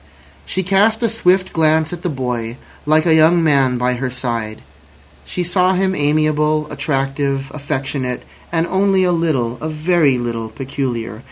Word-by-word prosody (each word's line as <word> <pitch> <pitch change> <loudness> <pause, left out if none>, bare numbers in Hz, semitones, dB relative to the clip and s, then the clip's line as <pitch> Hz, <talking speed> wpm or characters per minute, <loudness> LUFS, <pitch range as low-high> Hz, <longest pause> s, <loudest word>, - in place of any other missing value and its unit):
She 190 - -1
cast 205 +5 +2
a - - +4
swift 190 -4 +1
glance 160 0 +2
at 175 - -6
the 175 - -2
boy, 125 -4 -3 0.3
like 155 +1 +3
a 165 - +4
young 160 +2 +5
man, 135 -5 +3
by 125 +1 +1
her 130 +1 -3
side. 115 -4 -4 0.6
She 180 - -3
saw 180 +1 +2
him 190 +1 +1
amiable, 150 0 +1
attractive, 135 -1 -2
affectionate, 135 -3 -3 0.3
and 165 -1 +1
only 190 +1 +2
a 180 - +2
little, 135 -9 0
a 155 - -3
very 155 -3 +2
little, 115 -2 -3
peculiar. 120 -3 -4
150 Hz, 155 wpm, -18 LUFS, 130-175 Hz, 0.6 s, young